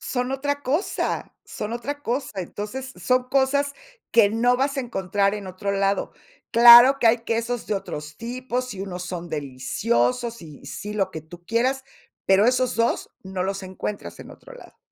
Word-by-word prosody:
Son 250 0 -2
otra 285 +1 -2
cosa, 305 +10 -2
son 210 +2 -6
otra 285 +5 -5
cosa. 255 +2 -2
Entonces, 230 +9 -6
son 255 0 +1
cosas 280 +1 +1 0.4
que 220 -3 +5
no 245 +3 +2
vas 275 +2 0
a 270 - +1
encontrar 200 -3 0
en 205 -2 -6
otro 200 +2 -3
lado. 195 0 0 0.4
Claro 240 +3 +9
que 235 - +2
hay 235 +1 +4
quesos 230 +1 -2
de 210 - -1
otros 150 -6 -6
tipos 250 +2 -4
y 190 - -7
unos 180 -2 -5
son 175 -1 -6
deliciosos, 230 - -1
y 150 -3 -12
sí, 210 +1 -6
lo 195 -2 0
que 160 - -6
tú 175 +2 -14
quieras, 255 +5 0 0.4
pero 195 +3 +5
esos 255 0 +2
2 230 0 0
no 190 -1 -4
los 195 +1 -3
encuentras 190 +2 -6
en - - -11
otro - - -13
lado. - - -15
230 Hz, 175 wpm, -24 LUFS, 195-255 Hz, 0.4 s, Claro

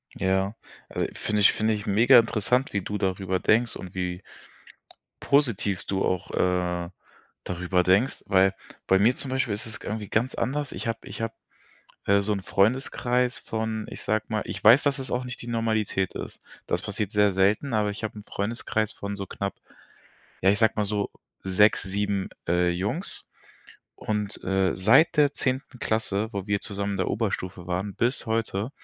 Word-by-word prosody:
Ja, 95 +3 0 0.3
also, - - -1
finde 105 -1 0
finde 110 +2 +4
ich 105 -1 -4
megainteressant, 115 +3 +4
wie 100 - 0
du 105 +3 -3
darüber 95 -1 -1
denkst 115 +4 +2
und 90 0 -8
wie 90 0 -3 1.0
positiv 115 -9 +1
du 95 -1 -1
auch, 90 0 -1
äh, 90 -1 0 0.6
darüber 90 0 0
denkst, 95 +9 +2
weil 95 0 +4 0.3
bei 95 - +4
mir 115 +5 +4
zum 135 - -1
Beispiel 130 -3 0
ist 105 +4 -4
es 110 -1 -6
irgendwie 105 -1 -4
ganz 120 +4 0
anders. 145 +1 -2
Ich - - -5
habe 115 0 -1
ich - - -8
habe, 115 - -2 0.7
äh, 100 0 +4
so 105 +1 -1
'n 100 - -1
Freundeskreis 125 +4 +1
von, 110 -1 -3
ich - - -8
sage 110 0 0
mal 110 -1 -1
ich - - -6
weiß, 115 +7 +8
dass 140 -1 +1
es 130 - -5
auch 125 +1 -1
nicht 125 0 -7
die 120 - -9
Normalität 110 -4 0
ist. - - -7 0.3
Das 90 +2 -1
passiert 105 0 -3
sehr 105 -1 +4
selten, 105 +8 +2
aber 105 -1 +1
ich 105 - -7
hab 110 - -3
'n 105 - -9
Freundeskreis 110 +1 -2
von 100 0 -5
so 100 -1 -5
knapp 100 +1 -4 0.9
ja, 95 - +4
ich 100 - +2
sage 110 - +4
mal 105 - +1
so 105 0 -1 0.3
6, 100 +3 +4
7, 100 0 -1 0.2
äh, 90 0 +3
Jungs. 105 - -3 0.7
Und, 105 -1 -3
äh, 95 -2 +1
seit 130 - +5
der 145 -1 +5
10. 130 -1 -2
Klasse, 110 -1 0
wo 100 0 -4
wir 100 -1 0
zusammen 100 -1 -3
in 100 - -2
der - - 0
Oberstufe 95 -5 -3
waren 95 +2 -2
bis 120 +3 0
heute, 110 0 -1
105 Hz, 175 wpm, -26 LUFS, 95-115 Hz, 1.0 s, weiß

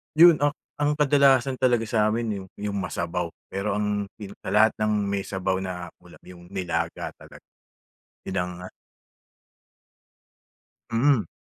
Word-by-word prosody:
'Yun 170 -1 +8
a 145 0 +2 0.2
ang 145 0 +2
kadalasan 140 -3 +4
talaga 125 -3 +2
sa 110 -2 +3
amin 110 -1 -1
'yung - - -17
'yung 105 -1 -2
masabaw, 95 -2 -3 0.2
pero 100 +1 -2
ang 105 -1 0
pin 100 -2 -9
sa - - -5
lahat 110 +1 +6
ng 110 0 +1 0.2
may 100 -1 -2
sabaw 95 -1 -1
na 90 -2 -5
ulam - - -17
'yung 90 -1 -13
nilaga 85 -3 -2
talaga. - - -14 0.8
Yun 95 - -3
ang 90 0 -2 2.4
mm. 120 - +3
105 Hz, 135 wpm, -25 LUFS, 95-130 Hz, 2.4 s, Yun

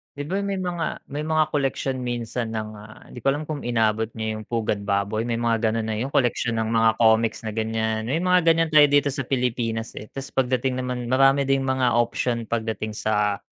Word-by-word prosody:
'Di 145 - -4
ba 195 +2 0
may 200 0 -2
mga 175 -2 -3
may 145 +2 -3
mga 155 -1 +2
koleksyon 135 -2 -1
minsan 120 -2 -3
ng, 110 -1 -3
ah, 105 +1 -13
'di - - -8
ko 125 - -4
alam 150 +2 -3
kung 150 -2 -5
inabot 110 -2 +1
mo 110 - -4
yung 110 0 -4
Pugad 105 -3 -2
Baboy? 100 +3 0
May 120 - 0
mga 115 -1 +1
ganun 115 -1 -2
na 110 - -1
yung 130 +4 -3
koleksyon 120 -2 +1
ng 110 - -2
mga 115 0 +4
comics 110 0 +3
na 110 - -3
ganyan. 110 0 -1
May 155 +7 0
mga 180 0 +4
ganyan 165 0 +4
tayo 150 -1 +7
dito 145 0 +3
sa 135 -1 -4
Pilipinas, 120 -3 -1
eh. 105 - -7
Ta's 135 0 -6
pagdating 130 0 0
naman 125 -1 -3
marami 135 +1 +4
ding 135 0 +1
mga 130 -3 +1
option 120 0 0
pagdating 110 -1 -3
sa 105 -1 0
120 Hz, 210 wpm, -24 LUFS, 110-135 Hz, -, tayo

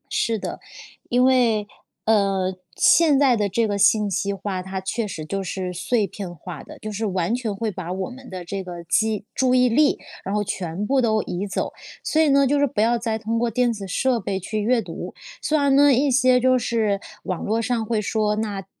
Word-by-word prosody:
是 225 -1 0
的， - - -5 0.5
因 245 +1 +3
为 240 -5 +3 0.4
呃， 195 -3 +2 0.2
现 315 -4 +5
在 270 -4 +4
的 205 -1 +1
这 225 +4 +1
个 205 -1 -1
信 205 +1 +3
息 200 +2 -1
化， 195 -1 -4
它 190 +1 -5
确 215 +4 -2
实 160 -6 -6
就 195 +5 -3
是 185 0 -4
碎 210 +5 0
片 195 -3 -7
化 170 -1 -8
的， - - -12
就 215 - -6
是 215 +2 -3
完 185 0 0
全 235 -4 -2
会 220 +2 -2
把 180 -2 -5
我 190 +3 -3
们 255 0 -12
的 185 -1 -6
这 195 +3 -4
个 175 -2 -8
记 215 +4 +1
注 255 -1 +2
意 250 0 +4
力， 290 +5 +3 0.3
然 195 +2 -2
后 210 - +1
全 185 0 -3
部 265 +3 +2
都 220 -3 +2
移 185 +3 -4
走， 195 - -2 0.3
所 315 - +2
以 315 - +4
呢 280 0 +5
就 285 +2 +2
是 285 - +3
不 220 -5 -1
要 235 +2 +3
再 225 -1 -2
通 225 +1 -2
过 240 0 +1
电 245 +1 +1
子 205 -4 -6
设 250 +6 +1
备 195 -1 -2
去 215 +4 -3
阅 230 +3 +2
读。 170 -5 -7 0.3
虽 310 - +1
然 280 -2 +3
呢 285 0 +6
一 270 +3 +2
些 255 0 +4
就 255 0 +4
是 220 -4 0 0.2
网 185 -2 -3
络 220 +2 0
上 230 -1 -1
会 220 -1 0
说， 210 0 0
那 205 -3 -3
215 Hz, 235 characters per minute, -23 LUFS, 195-245 Hz, 0.5 s, 呢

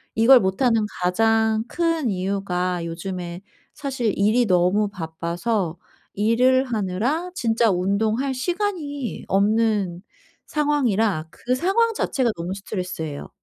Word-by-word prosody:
이걸 245 +3 +7
못하는 220 +4 +2 0.2
가장 220 +4 +2
큰 330 -6 0
이유가 185 -2 -2
요즘에 175 +1 -5 0.3
사실 260 -7 -2
일이 220 +5 +3
너무 185 +2 +2
바빠서 170 +2 -3 0.4
일을 250 +5 +3
하느라 240 - -1
진짜 230 - +2
운동할 215 +8 0
시간이 300 - -3
없는 205 -3 +1 0.4
상황이라 225 - +1
그 250 +7 -2
상황 450 - +2
자체가 260 - 0
너무 170 +2 -4
스트레스예요. 180 -7 -5
220 Hz, 250 characters per minute, -23 LUFS, 185-255 Hz, 0.4 s, 이걸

